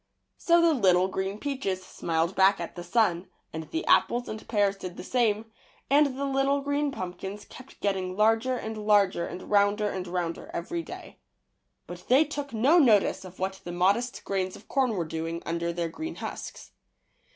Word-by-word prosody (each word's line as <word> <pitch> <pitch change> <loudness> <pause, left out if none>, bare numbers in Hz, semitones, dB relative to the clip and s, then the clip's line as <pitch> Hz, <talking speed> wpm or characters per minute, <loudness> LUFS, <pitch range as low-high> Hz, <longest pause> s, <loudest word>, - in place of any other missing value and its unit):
'' - - -52
So 340 0 +4
the 335 -1 +4
little 185 -7 +4
green 190 +1 -3
peiaches 215 -9 -3
smiled 165 +2 -1
back 195 +1 +4
at 170 - -6
the 175 - -6
sun, 185 -4 +1 0.3
and 160 0 -6
the 325 +2 -3
apples 245 +1 +3
and 215 0 -7
pears 205 -3 +2
did 185 -2 -8
the - - -7
same, 225 -1 0 0.4
and 280 -2 +4
the 280 - -1
little 275 +1 +1
green 285 +1 0
pumpkins 190 -1 -6
kept 255 +1 -14
getting 190 -2 -1
larger 225 +4 +3
and 220 -2 -5
larger 205 -4 +3
and 185 - -7
rounder 205 +1 +3
and 185 -1 -5
rounder 175 -1 -3
every 260 - -3
day. - - -10 0.7
But - - -10
they 275 +5 +5
took 290 -2 -5
no 260 +10 +4
notice 220 -12 +4
of 185 -1 -11
what 190 +1 -3
the 175 - -6
modest 200 +8 +1
grains 190 -1 -2
of 210 - -15
corn 260 -4 +1
were 175 -3 -1
doing 165 +1 -4
under 170 0 -2
their 170 -1 -2
green 315 - -6
husks. - - -7
205 Hz, 185 wpm, -27 LUFS, 185-255 Hz, 0.7 s, they